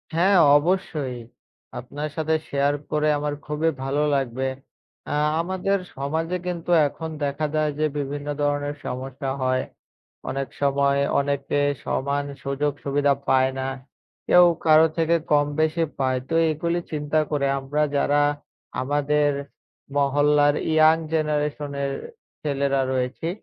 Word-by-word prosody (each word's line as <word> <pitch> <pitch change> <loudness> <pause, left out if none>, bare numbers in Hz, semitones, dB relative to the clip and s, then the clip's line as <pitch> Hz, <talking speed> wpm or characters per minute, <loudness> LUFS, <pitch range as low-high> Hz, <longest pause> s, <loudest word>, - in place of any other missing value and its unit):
হ্যাঁ, 190 +4 +4 0.2
অবশ্যই। 150 -6 -1 0.6
আপনার 145 +5 -5
সাথে 160 0 +1
শেয়ার 140 +1 +1 0.2
করে 150 0 +1
আমার 145 0 -2
খুবই 150 +2 0
ভালো 135 +2 0
লাগবে, 130 -1 -1 0.7
আ - - 0 0.3
আমাদের 190 +3 0 0.2
সমাজে 160 +6 -2
কিন্তু 175 -1 -3 0.2
এখন 160 +3 -6
দেখা 140 +2 -1
দেয় 155 -1 +1
যে, 155 - +2
বিভিন্ন 145 0 -4
ধরনের 145 0 0
সমস্যা 130 +2 -4
হয়, 130 0 +1 0.7
অনেক 135 +1 -2
সময় 140 0 +2 0.2
অনেকে 140 0 -1 0.3
সমান 140 +1 -1 0.2
সুযোগ-সুবিধা 140 0 0 0.2
পায় 130 0 +4
না, 130 - -2 0.6
কেউ 180 0 +7 0.2
কারো 155 0 +7
থেকে 165 0 +3 0.2
কম-বেশি 155 +3 +2 0.2
পায়, 130 -1 +1
তো - - -3 0.2
এগুলি 170 +3 -1
চিন্তা 150 0 -1
করে 140 -2 +1
আমরা 140 +3 -2 0.2
যারা 145 +1 +2 0.6
আমাদের 145 +2 +1 0.7
মহল্লার 145 +1 +3 0.2
ইয়াং 155 0 +6 0.2
জেনারেশনের 150 -2 -1 0.5
ছেলেরা 140 -2 +1
রয়েছি, 130 +5 -2
145 Hz, 120 wpm, -24 LUFS, 140-155 Hz, 0.7 s, কেউ